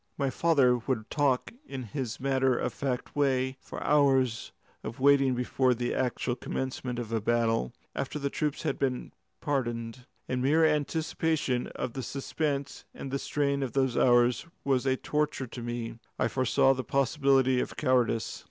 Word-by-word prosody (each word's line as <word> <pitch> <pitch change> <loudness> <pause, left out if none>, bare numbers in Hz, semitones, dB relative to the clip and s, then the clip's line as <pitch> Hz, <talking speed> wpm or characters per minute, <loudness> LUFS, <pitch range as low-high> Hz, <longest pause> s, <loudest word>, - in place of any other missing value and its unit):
My 140 -2 0
father 135 -6 +3
would 115 -2 -3
talk 140 - +1
in 135 - -6
his 120 0 -4
matter 130 -1 +2
of - - -2
fact 130 -3 -3
way 130 -3 +2
of - - -22
the - - -5
hours 135 -5 +3 0.3
of 115 +5 -6
waiting 135 -1 +4
before 125 +1 +1
the 120 +1 -2
actual 125 -1 -1
commencement 130 -1 -4
of 115 -2 -5
a 110 - +1
battle, 115 - +1 0.2
after 135 +2 -3
the 140 -1 -2
troops 150 -2 -2
had 155 - -1
been 130 -2 -1 0.3
paraded. 120 -2 -2 0.2
The 130 - -2
mere 150 +6 +4
anticipation 155 -3 0
of 120 - -3
the 135 - -4
suspense 140 +1 -3
and 135 - -6
the 140 - -1
strain 140 -1 0
of 130 -3 -3
those 130 -3 +1
hours 120 +3 +4 0.2
was 135 -1 +1
a 130 0 +2
torture 150 -2 -1
to 120 0 -8
me. 120 -1 -5 0.2
I - - +2
foresaw 135 +1 +3
the 130 -1 -4
possibility 135 0 +2
of - - -3
cowardice. 125 -3 +1
130 Hz, 165 wpm, -29 LUFS, 125-140 Hz, 0.3 s, waiting